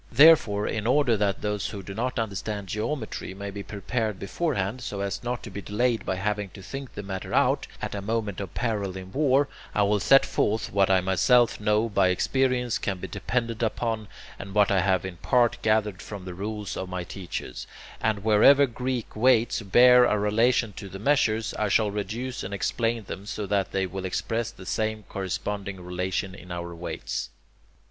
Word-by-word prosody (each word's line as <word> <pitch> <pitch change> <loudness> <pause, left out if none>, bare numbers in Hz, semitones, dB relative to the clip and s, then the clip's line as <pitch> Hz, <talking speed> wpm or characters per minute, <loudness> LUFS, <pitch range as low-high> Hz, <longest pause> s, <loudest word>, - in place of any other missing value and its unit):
Therefore, 120 -7 +6
in 110 0 -2
order 130 -2 +3
that 100 -2 0
those 105 -1 -1
who 100 -2 -7
do 95 - -7
not 125 +5 -2
understand 105 -2 -3
geometry 110 -3 -3
may 100 +1 -6
be 100 0 -6
prepared 110 +1 -3
beforehand, 100 - -2
so 100 -4 -4
as 100 0 -3
not 120 +1 -3
to 115 - -8
be 100 - -6
delayed 115 +5 0
by 95 - 0
having 105 +1 -2
to 95 - -10
think 135 +5 -7
the 105 - -5
matter 95 -1 -4
out - - +2 0.2
at - - -3
a 100 - -3
moment 105 -2 -2
of 95 -4 -7
peril 100 -5 -1
in 95 0 -9
war, 140 +2 +3 0.3
I 105 - +4
will 105 +1 +2
set 135 +6 +6
forth 110 +1 0
what 100 -1 +3
I 95 -1 +4
myself 115 +6 +3
know 105 +1 +2
by 100 -4 +3
experience 125 +5 +1
can 95 -2 -2
be - - -6
depended 115 -2 -2
upon, 115 -1 -1 0.3
and 100 +1 -8
what 105 -1 +4
I 95 - +4
have 95 -1 +1
in 90 -2 -6
part 120 +6 +2
gathered 110 -2 +1
from 100 -3 -8
the 90 - -6
rules 105 +2 -4
of 95 - -5
my 90 -1 -3
teachers, 90 +1 -6 0.3
and 105 -3 0
wherever 110 +7 +6
Greek 125 -1 -4
weights 120 0 +3
bear 125 +5 +7
a 105 - +2
relation 115 +2 +2
to 100 - -7
the 95 - -7
measures, 115 -2 +1
I 105 -1 +1
shall 105 0 +3
reduce 115 +5 -4
and 100 +2 -4
explain 115 +3 -1
them 100 +1 -8
so 105 - -3
that 100 -1 0
they 95 -1 0
will 95 +1 -5
express 115 +5 -2
the 105 -5 -12
same 110 +2 -1
corresponding 100 +1 -4
relation 90 +2 -3
in 90 -1 -11
our 85 0 -5
weights. 85 +1 -4
105 Hz, 190 wpm, -26 LUFS, 95-115 Hz, 0.3 s, bear